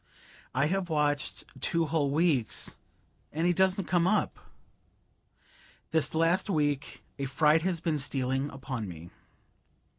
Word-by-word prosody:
I 140 Hz, +2 st, +3 dB
have 185 Hz, +2 st, -1 dB
watched 145 Hz, -2 st, 0 dB, 0.2 s
two 165 Hz, +3 st, +2 dB
whole 150 Hz, -2 st, +1 dB
weeks, 145 Hz, -5 st, +1 dB, 0.6 s
and 160 Hz, +3 st, -1 dB
he 175 Hz, -, +4 dB
doesn't 190 Hz, +1 st, +2 dB
come 175 Hz, +1 st, +2 dB
up! 215 Hz, -, +1 dB, 1.5 s
This 160 Hz, -2 st, +1 dB
last 165 Hz, +5 st, +2 dB
week 145 Hz, -5 st, -1 dB, 0.2 s
a 140 Hz, -, -1 dB
fright 150 Hz, +4 st, +3 dB
has 175 Hz, -1 st, -1 dB
been 160 Hz, -3 st, 0 dB
stealing 135 Hz, 0 st, -1 dB
upon 130 Hz, -5 st, -5 dB
me. 85 Hz, -1 st, -9 dB
150 Hz, 125 wpm, -29 LUFS, 140-170 Hz, 1.5 s, he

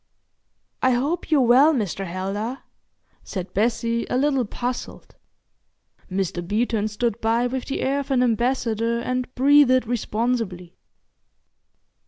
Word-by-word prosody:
"I 260 Hz, 0 st, +3 dB
hope 285 Hz, +10 st, -1 dB
you're 305 Hz, -4 st, +4 dB
well, 265 Hz, +6 st, +5 dB
Mr. 195 Hz, -4 st, -2 dB
Heldar?" 195 Hz, +8 st, -4 dB, 0.6 s
said 185 Hz, -1 st, -6 dB
Bessie, 230 Hz, +2 st, 0 dB
a -, -, 0 dB
little 270 Hz, -2 st, +1 dB
puzzled. 245 Hz, +4 st, -6 dB, 1.0 s
Mr. 185 Hz, -2 st, -2 dB
Beeton 215 Hz, +3 st, 0 dB
stood 225 Hz, +1 st, -2 dB
by 230 Hz, +2 st, +1 dB
with 255 Hz, +1 st, -3 dB
the 275 Hz, -, -3 dB
air 275 Hz, +2 st, 0 dB
of 280 Hz, -, -6 dB
an 255 Hz, -2 st, +3 dB
ambassador 235 Hz, -1 st, 0 dB
and 255 Hz, +1 st, -3 dB
breathed 265 Hz, -2 st, +5 dB
responsibly. 225 Hz, -6 st, -2 dB
240 Hz, 120 wpm, -23 LUFS, 215-255 Hz, 1.0 s, well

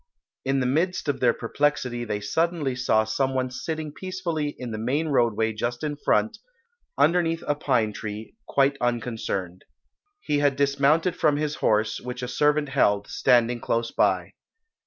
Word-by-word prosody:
In 135 Hz, 0 st, +1 dB
the -, -, 0 dB
midst 165 Hz, +7 st, 0 dB
of 145 Hz, -, 0 dB
their 120 Hz, -2 st, +4 dB
perplexity 125 Hz, -1 st, -1 dB
they 105 Hz, -2 st, -2 dB
suddenly 160 Hz, +5 st, 0 dB
saw 115 Hz, -3 st, +2 dB
some 130 Hz, +5 st, -1 dB
one 130 Hz, -1 st, -1 dB
sitting 155 Hz, +4 st, -4 dB
peacefully 170 Hz, -6 st, -3 dB
in 125 Hz, -2 st, -6 dB
the 110 Hz, -, -4 dB
main 140 Hz, +8 st, 0 dB
roadway 115 Hz, -4 st, +2 dB
just 120 Hz, +4 st, -3 dB
in 150 Hz, -1 st, -2 dB
front, 220 Hz, +9 st, +1 dB, 0.6 s
underneath 165 Hz, -1 st, +2 dB
a 145 Hz, -, +2 dB
pine 125 Hz, -7 st, 0 dB
tree, 105 Hz, +1 st, -7 dB
quite 140 Hz, 0 st, +2 dB
unconcerned. 110 Hz, -7 st, -2 dB, 0.6 s
He 145 Hz, -, 0 dB
had 145 Hz, -2 st, +2 dB
dismounted 140 Hz, +5 st, +2 dB
from 150 Hz, -4 st, +2 dB
his 150 Hz, 0 st, -2 dB
horse, 110 Hz, 0 st, +1 dB
which 125 Hz, 0 st, -6 dB
a -, -, -2 dB
servant 150 Hz, +3 st, +1 dB
held, 105 Hz, -7 st, +2 dB
standing 120 Hz, -2 st, +2 dB
close 115 Hz, 0 st, -1 dB
by. -, -, +1 dB
130 Hz, 155 wpm, -25 LUFS, 115-150 Hz, 0.6 s, their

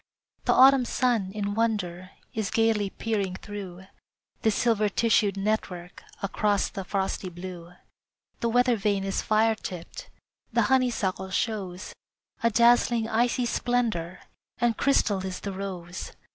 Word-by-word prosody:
The -, -, +4 dB
autumn 265 Hz, -1 st, +7 dB
sun, 235 Hz, -7 st, 0 dB
in 205 Hz, 0 st, -3 dB
wonder, 195 Hz, -5 st, -1 dB, 0.2 s
Is 220 Hz, -2 st, -2 dB
gayly 225 Hz, -3 st, +2 dB
peering 200 Hz, -4 st, -2 dB
through 190 Hz, -3 st, -8 dB, 0.6 s
This 220 Hz, -2 st, +2 dB
silver 220 Hz, -3 st, +2 dB
tissued 205 Hz, -2 st, +2 dB
network 195 Hz, -4 st, -3 dB, 0.2 s
Across 205 Hz, 0 st, +1 dB
the 195 Hz, -, -6 dB
frosty 190 Hz, -1 st, -2 dB
blue. 175 Hz, -1 st, -9 dB, 0.7 s
The 235 Hz, -, 0 dB
weather 245 Hz, +1 st, +3 dB
vane 200 Hz, -1 st, 0 dB
is 195 Hz, 0 st, -1 dB
fire 220 Hz, +1 st, +3 dB
tipped, 180 Hz, -5 st, -8 dB, 0.4 s
The 235 Hz, 0 st, +3 dB
honeysuckle 215 Hz, -7 st, 0 dB
shows 190 Hz, -3 st, -3 dB, 0.5 s
A 230 Hz, -, +3 dB
dazzling 235 Hz, 0 st, +4 dB
icy 240 Hz, +2 st, +1 dB
splendor, 230 Hz, -9 st, -1 dB, 0.4 s
And 240 Hz, -2 st, +1 dB
crystal 205 Hz, -8 st, +2 dB
is 185 Hz, -1 st, -4 dB
the 200 Hz, -, -4 dB
rose. 185 Hz, -2 st, -6 dB
205 Hz, 130 wpm, -27 LUFS, 190-230 Hz, 0.7 s, autumn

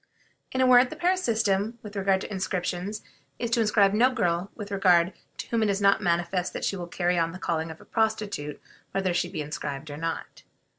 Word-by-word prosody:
In 260 Hz, -, 0 dB
a -, -, +5 dB
word, 250 Hz, 0 st, +6 dB
the -, -, -7 dB
Paris 365 Hz, +4 st, +1 dB
system 220 Hz, -1 st, +1 dB
with 210 Hz, -1 st, -9 dB
regard 195 Hz, -1 st, +2 dB
to -, -, -7 dB
inscriptions 185 Hz, +1 st, -3 dB, 0.3 s
is 235 Hz, -1 st, -3 dB
to 235 Hz, -, +3 dB
inscribe 205 Hz, -2 st, +4 dB
no 240 Hz, +5 st, +5 dB
girl 180 Hz, -6 st, 0 dB
with 205 Hz, -2 st, -7 dB
regard 185 Hz, -2 st, +4 dB, 0.2 s
to -, -, -6 dB
whom 230 Hz, -1 st, +1 dB
it 215 Hz, -, +2 dB
is 200 Hz, 0 st, +1 dB
not 200 Hz, -1 st, +4 dB
manifest 175 Hz, +1 st, 0 dB
that -, -, -3 dB
she -, -, 0 dB
will 175 Hz, -2 st, -5 dB
carry 175 Hz, 0 st, 0 dB
on 165 Hz, 0 st, 0 dB
the -, -, -6 dB
calling 165 Hz, -3 st, -2 dB
of 160 Hz, -, -9 dB
a -, -, -16 dB
prostitute 210 Hz, -9 st, -1 dB, 0.3 s
whether 190 Hz, -2 st, 0 dB
she 175 Hz, 0 st, 0 dB
be 170 Hz, -4 st, -4 dB
inscribed 145 Hz, 0 st, -5 dB
or 145 Hz, -, -6 dB
not. 165 Hz, +1 st, -4 dB
195 Hz, 215 wpm, -27 LUFS, 175-220 Hz, 0.3 s, word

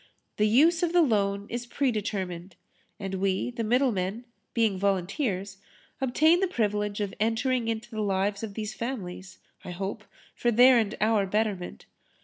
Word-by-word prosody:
The 210 Hz, -, +3 dB
use 315 Hz, +10 st, +4 dB
of 345 Hz, -1 st, 0 dB
the 350 Hz, -, +6 dB
loan 200 Hz, -6 st, +1 dB
is 240 Hz, +1 st, -5 dB
pre 270 Hz, +1 st, 0 dB
determined. 190 Hz, -4 st, -4 dB, 0.4 s
And 195 Hz, -1 st, -5 dB
we, 195 Hz, +4 st, 0 dB
the 235 Hz, -1 st, -4 dB
middlemen, 225 Hz, -3 st, 0 dB, 0.3 s
being 225 Hz, -4 st, +2 dB
volunteers, 195 Hz, -, -1 dB, 0.4 s
obtain 310 Hz, +7 st, +4 dB
the 385 Hz, -, +2 dB
privilege 210 Hz, -, -1 dB
of 200 Hz, -2 st, -2 dB
entering 230 Hz, +2 st, 0 dB
into 225 Hz, +1 st, -3 dB
the 215 Hz, -1 st, -3 dB
lives 200 Hz, 0 st, 0 dB
of 215 Hz, -3 st, -6 dB
these 215 Hz, -1 st, -4 dB
families, 190 Hz, -7 st, -6 dB, 0.3 s
I -, -, -8 dB
hope, 195 Hz, +4 st, -5 dB, 0.3 s
for 240 Hz, -, 0 dB
their 245 Hz, +2 st, +6 dB
and 215 Hz, 0 st, -2 dB
our 215 Hz, -2 st, +2 dB
betterment. 205 Hz, -3 st, -2 dB
215 Hz, 155 wpm, -27 LUFS, 195-240 Hz, 0.4 s, the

